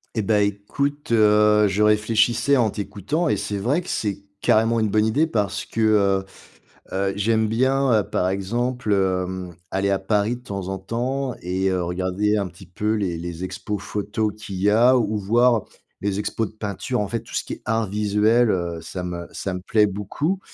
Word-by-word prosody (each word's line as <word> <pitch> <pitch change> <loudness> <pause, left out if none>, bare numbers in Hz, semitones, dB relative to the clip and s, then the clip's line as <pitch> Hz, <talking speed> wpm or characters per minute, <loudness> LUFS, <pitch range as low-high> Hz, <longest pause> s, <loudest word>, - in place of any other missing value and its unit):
Et 110 - 0
bah, 105 +1 +2
écoute, 120 +9 -2
heu, 105 -1 +5
je 100 +2 +1
réfléchissais 110 +5 +3
en 115 -4 +2
t'écoutant 105 - -2
et - - +1
c'est 100 -1 -3
vrai 135 - +1
que, 180 - -13
c'est 100 -2 -2 0.2
carrément 115 +1 +3
une 110 -1 +1
bonne 105 +1 +2
idée 145 +9 +2
parce 105 - -1
que, 115 - -3
heu, 100 -3 +3 0.7
heu, 95 +1 0
j'aime 110 +1 +2
bien, 130 +4 +2
heu, - - -3
par 90 - -1
exemple, 115 +5 -1
hem, 95 -2 -1 0.2
aller 95 +1 0
à 100 -1 +2
Paris 105 +4 0
de 125 - -15
temps 100 -6 -5
en 95 0 -3
temps 125 +6 -2
et 95 +2 -1
heu, 90 -1 0
regarder 95 +4 0
un 100 -2 -1
petit 90 +2 -15
peu 105 +5 -1
les 95 -5 -1
les 85 +1 -5
expos 100 +2 -4
photo 105 +2 -2
qu'il 105 -2 -7
y 95 +3 +1
a 120 +5 +5
ou 110 -2 0
voir 115 +3 +3 0.4
les 100 -1 -1
expos 110 +1 -2
de - - -22
peinture. 110 +4 -3
En 105 - -2
fait 115 +2 -2
tout 115 - -15
ce - - 0
qui - - -5
est - - -18
art 115 0 0
visuel, 105 +3 +2
heu, 85 -3 -2
ça 90 +2 -6
me 85 -1 -5
ça 95 - -4
me 90 - -4
plaît 105 +3 +3
beaucoup 105 - -2
105 Hz, 200 wpm, -23 LUFS, 95-115 Hz, 0.7 s, heu